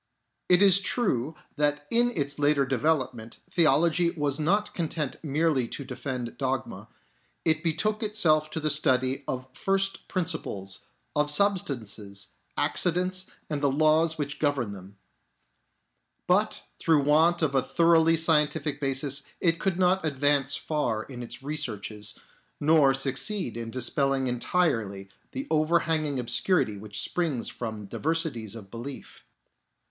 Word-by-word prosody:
It 180 +2 +6
is 195 -1 +6
true 160 - 0 0.2
that 145 0 0
in 240 +1 +4
its 145 -9 -2
later 145 -1 +3
development 130 -4 -1
theology 170 +1 +3
was 145 -5 -2
not 200 +7 +1
content 155 -4 -2
merely 150 -4 +1
to 140 - -6
defend 125 -3 -5
dogma; 135 -2 -3 0.6
it 160 0 +2
betook 210 +7 0
itself 165 -8 +3
to 160 - -4
the 155 -1 0
study 130 -2 +1
of 130 0 -4
first 195 +3 0
principles, 155 - -2 0.3
of 150 0 +2
substances, 120 - 0 0.3
accidents 180 +2 +1 0.2
and 150 -2 -3
the 140 - +3
laws 155 +3 +3
which 145 -1 -4
govern 140 -8 0
them; 100 0 -11 1.3
but - - +1 0.2
through 160 -3 +3
want 160 +4 +4
of 145 -3 +1
a 135 - +3
thoroughly 165 0 +3
scientific 150 -2 +2
basis, 135 +1 +1 0.2
it 165 -2 +2
could 190 -3 -1
not 185 0 +3
advance 145 -2 +2
far 120 -8 -1
in 125 -1 -9
its 120 +2 -8
researches, 110 -8 -4 0.4
nor 145 -3 +4
succeed 135 - -1
in 115 -1 -5
dispelling 135 +2 0
entirely 115 - 0 0.2
the 270 - -5
overhanging 155 -2 +1
obscurity 125 - +1
which 105 +1 -4
springs 160 -9 -1
from 110 -3 -6
diversities 140 - -2
of 100 -4 -11
belief 125 +4 -9
150 Hz, 130 wpm, -27 LUFS, 130-165 Hz, 1.3 s, It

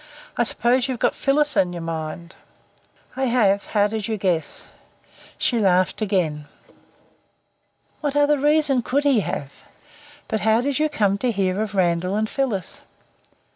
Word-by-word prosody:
I - - 0
suppose 250 0 +2
you've 260 -2 -3
got - - +1
Phyllis 295 +1 +2
in 180 -1 +2
your 170 -1 -6
mind." 165 +1 -6 0.8
"I 265 0 -1
have. 210 -5 +2
How 205 -2 +2
did 215 -1 -3
you 220 -1 -2
guess?" 180 -5 -2 0.7
She 240 - 0
laughed 185 0 +2
again. 170 -8 -1 1.5
"What 290 -2 -3
other 290 0 +3
reason 295 -2 +3
could 275 +5 -1
he 280 -5 +3
have? 145 -7 -5 0.6
But 220 -1 -2
how 220 +1 +3
did 280 +1 -1
you 310 0 +1
come 205 -8 0
to 250 +1 0
hear 195 -1 -1
of 210 -1 -4
Randall 180 0 +1
and 215 +1 0
Phyllis?" 220 -9 -3
215 Hz, 150 wpm, -22 LUFS, 185-265 Hz, 1.5 s, other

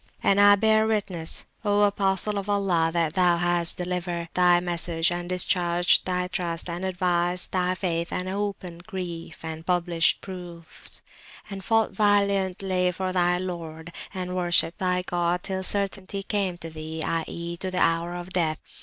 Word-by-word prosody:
And 200 +1 +4
I 205 0 +8
bear 220 +1 +3
Witness, 200 -7 -2 0.2
O 205 -1 +3
Apostle 200 0 +1
of 200 +1 -6
Allah! 185 -5 +2
that 165 -2 0
Thou 180 -2 +3
hast 175 0 +2
delivered 175 -1 -3
thy 180 -1 +5
Message, 170 -1 0
and 175 0 -4
discharged 180 -1 +2
Thy 180 0 -1
Trust, 175 -2 -4
and 175 +1 -5
advised 180 -1 +1
Thy 185 0 0
Faith, 170 -2 -2
and 180 - -3
opened 190 -3 -4
Grief, 175 -5 -6
and 160 0 -6
published 175 -1 +2
Proofs, 175 -3 -9 0.5
and 195 -1 -6
fought 225 +2 +2
valiantly 195 -3 +1
for 185 +1 -3
Thy 175 -1 +2
Lord, 170 -2 -6 0.2
and 180 -2 -4
worshipped 175 -2 +3
Thy 180 -1 0
God 175 0 -1
till 190 -1 -2
Certainty 195 0 -1
came 195 -3 -1
to 165 -2 -8
Thee 160 0 -5
(i.e. 170 +1 -3
to 185 - -3
the 185 - -4
hour 170 0 +1
of 175 +1 -7
death). 160 -3 0
180 Hz, 155 wpm, -25 LUFS, 170-190 Hz, 0.5 s, I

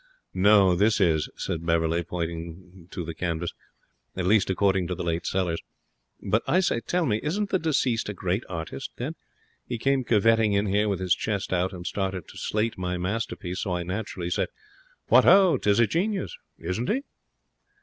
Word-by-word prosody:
'No, 100 -1 +5
this 105 +4 +3
is,' 80 -5 +2
said 80 -1 -3
Beverley, 85 0 +1
pointing 85 +1 -6
to 90 -3 -5
the 80 - -5
canvas. 85 0 -2 0.6
'At 95 - -2
least, 105 +1 +3
according 95 -1 +2
to 90 - -2
the - - -4
late 85 0 -2
Sellers. 90 -3 -1 0.6
But, - - +1
I 180 - +3
say, 175 -10 +1
tell 175 +8 -1
me, 110 -5 +1
isn't 200 +7 -2
the 190 - +2
deceased 135 -9 0
a 105 - -4
great 95 +3 -1
artist, 80 -6 -5
then? - - -3 0.5
He 120 - -3
came 135 +3 +1
curveting 110 -1 +3
in 100 +1 +2
here 105 +1 +1
with 100 -3 -1
his 90 -2 +2
chest 100 0 -2
out 95 +1 +1
and 90 -2 -8
started 95 -4 -3
to - - -12
slate 110 -1 -1
my 90 0 -2
masterpiece, 90 -1 -3
so 90 -4 -1
I 90 - -2
naturally 90 -1 -4
said, - - +1 0.6
"What - - +7
ho! 190 -3 +6
'Tis 105 +1 +2
a 120 - +6
genius!" 175 - -1 0.2
Isn't 90 +9 -3
he?' 265 +5 0
95 Hz, 180 wpm, -26 LUFS, 90-110 Hz, 0.6 s, What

